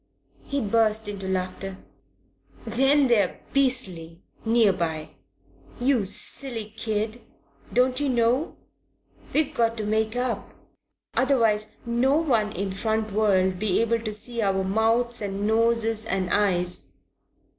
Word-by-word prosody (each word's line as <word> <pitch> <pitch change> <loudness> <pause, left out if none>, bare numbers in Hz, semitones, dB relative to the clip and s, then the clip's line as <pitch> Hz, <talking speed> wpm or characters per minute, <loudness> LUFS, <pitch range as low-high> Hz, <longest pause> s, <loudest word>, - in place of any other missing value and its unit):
He 280 0 -2
burst 220 0 +1
into 200 -2 -5
laughter. 190 +1 -3 0.9
"Then 270 +5 +4
they're 215 -7 +2
beastly, 185 -12 0 0.2
near 225 -3 +4
by! 160 -3 -3 0.7
You 245 -4 +2
silly 225 +2 -3
kid, 220 +1 -2 0.5
don't 255 +1 +2
you 290 -1 0
know? 245 +4 +1 0.8
We've 305 -1 +1
got 230 0 +1
to 215 - -3
make 220 +2 0
up, 250 -1 -3 0.6
otherwise 225 -6 +2
no 245 +5 +2
one 235 -10 +1
in 195 +2 -3
front 220 +2 -1
would 190 -3 +2
be 205 -2 +1
able 230 0 +1
to 220 -1 -4
see 230 +3 -4
our 195 -2 +1
mouths 225 +4 +1
and 200 0 -3
noses 225 0 +2
and 190 -4 -1
eyes. 180 -3 0
220 Hz, 125 wpm, -25 LUFS, 195-240 Hz, 0.9 s, Then